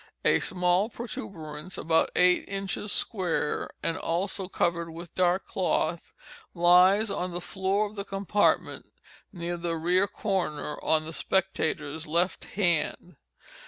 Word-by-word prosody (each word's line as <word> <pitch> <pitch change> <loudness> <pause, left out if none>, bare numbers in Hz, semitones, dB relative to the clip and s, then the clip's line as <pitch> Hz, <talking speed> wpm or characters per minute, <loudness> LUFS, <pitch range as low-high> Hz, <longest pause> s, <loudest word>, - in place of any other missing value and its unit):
A - - +5
small 180 +3 +1
protuberance 185 - -6
about 160 0 +2
eight 180 0 +4
inches 195 +1 -3
square, 180 -8 -1
and 165 - 0
also 190 +3 -1
covered 170 -2 0
with 165 +1 -9
dark 180 +1 +2
cloth, 170 -3 -1 0.4
lies 180 +5 +5
on 180 -2 -2
the 175 - -2
floor 190 +3 0
of 210 +1 -8
the 200 - -3
compartment 195 +1 0 0.4
near 175 -1 -4
the 170 -1 -2
rear 180 +4 +2
corner 180 -9 -2
on 155 -1 +2
the 160 - -6
spectators' 160 -5 -1
left 170 +4 0
hand. 175 -2 -1
180 Hz, 125 wpm, -28 LUFS, 165-195 Hz, 0.4 s, A